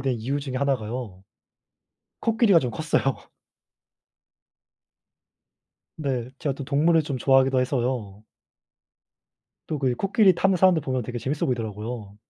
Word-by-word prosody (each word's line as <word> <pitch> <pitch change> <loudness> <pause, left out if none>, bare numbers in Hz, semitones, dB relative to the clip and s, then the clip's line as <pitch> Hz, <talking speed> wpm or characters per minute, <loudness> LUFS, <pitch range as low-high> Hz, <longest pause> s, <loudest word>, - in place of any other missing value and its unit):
된 130 -1 0
이유 135 +6 -2
중에 135 -2 -6
1 140 0 +1
가요. 110 -4 -7 1.0
코끼리가 225 -5 +4
좀 125 -5 -3
컸어요. 135 0 0 2.8
네. 130 -5 -2
제가 145 - -1
또 140 - -7
동물을 160 +4 +3
좀 145 -3 -4
좋아하기도 135 +1 +3
해서요. 120 -6 -2 1.5
또 155 - -3
그 135 -2 +1
이 - - 0
코끼리 195 - +3
타는 190 +2 +2
사람들 180 -2 +4
보면 130 -2 -2
되게 120 +2 -5
재미있어 140 +5 -2
보이더라고요. 110 -3 -4
130 Hz, 275 characters per minute, -24 LUFS, 120-150 Hz, 2.8 s, 코끼리가